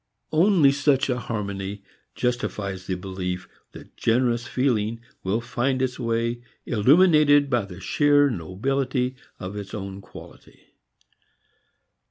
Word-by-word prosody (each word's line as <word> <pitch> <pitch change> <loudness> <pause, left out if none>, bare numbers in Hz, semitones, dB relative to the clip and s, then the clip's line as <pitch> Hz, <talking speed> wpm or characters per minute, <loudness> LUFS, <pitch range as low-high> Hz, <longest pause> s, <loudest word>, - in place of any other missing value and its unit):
Only 165 -3 +5
such 140 -1 +2
a 125 - -1
harmony 100 -3 -4 0.3
justifies 100 -6 -2
the 95 - -1
belief 90 -1 -5 0.3
that - - -13
generous 120 0 +1
feeling 115 -4 0 0.2
will 100 +5 0
find 120 +2 -1
its 130 0 -1
way 115 0 -1 0.2
illuminated 145 - +5
by 120 -5 +1
the 90 -2 -10
sheer 145 - +3
nobility 125 - -1 0.2
of 95 +2 -6
its 100 +1 -6
own 100 -1 -6
quality. - - -15
120 Hz, 115 wpm, -24 LUFS, 100-135 Hz, 0.3 s, Only